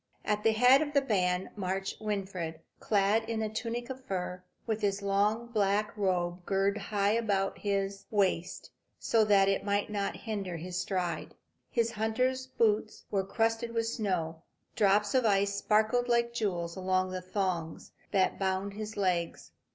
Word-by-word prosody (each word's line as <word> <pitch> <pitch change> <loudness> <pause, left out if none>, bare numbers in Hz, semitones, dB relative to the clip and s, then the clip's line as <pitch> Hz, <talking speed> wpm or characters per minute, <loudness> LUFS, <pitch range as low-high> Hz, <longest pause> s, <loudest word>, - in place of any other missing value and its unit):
At 210 0 +1
the 225 - +4
head 250 +5 +6
of 290 -1 -2
the 280 - +4
band 185 -7 0
marched 195 0 -3
Winfried, 190 -6 -3 0.2
clad 210 +2 +2
in 220 -1 -1
a 215 - -1
tunic 235 +2 -4
of 260 0 -8
fur, 180 -4 -4 0.2
with 220 -1 -2
his 200 -1 0
long 205 +4 +1
black 210 -1 +1
robe 180 -3 -1
girt 195 +1 +1
high 205 -1 0
about 205 -4 0
his 195 -1 -2
waist, 190 -4 0 0.3
so 225 -1 +2
that 200 -2 +5
it 195 - +1
might 205 +1 0
not 200 -1 -1
hinder 200 -6 -4
his 175 +2 -6
stride. 180 -5 -3 0.3
His 230 -1 +1
hunter's 255 +4 0
boots 220 -4 0
were 195 -2 +1
crusted 225 +3 -1
with 230 0 +1
snow. 185 -8 -2 0.3
Drops 205 0 +3
of 260 -1 +3
ice 200 -2 +3
sparkled 215 +4 +2
like 235 0 +2
jewels 175 -7 -2
along 185 0 0
the 185 0 -4
thongs 180 -3 -3 0.2
that 195 -2 +1
bound 190 +1 -1
his 215 +1 -6
legs. 180 -4 -1
200 Hz, 160 wpm, -30 LUFS, 190-220 Hz, 0.3 s, head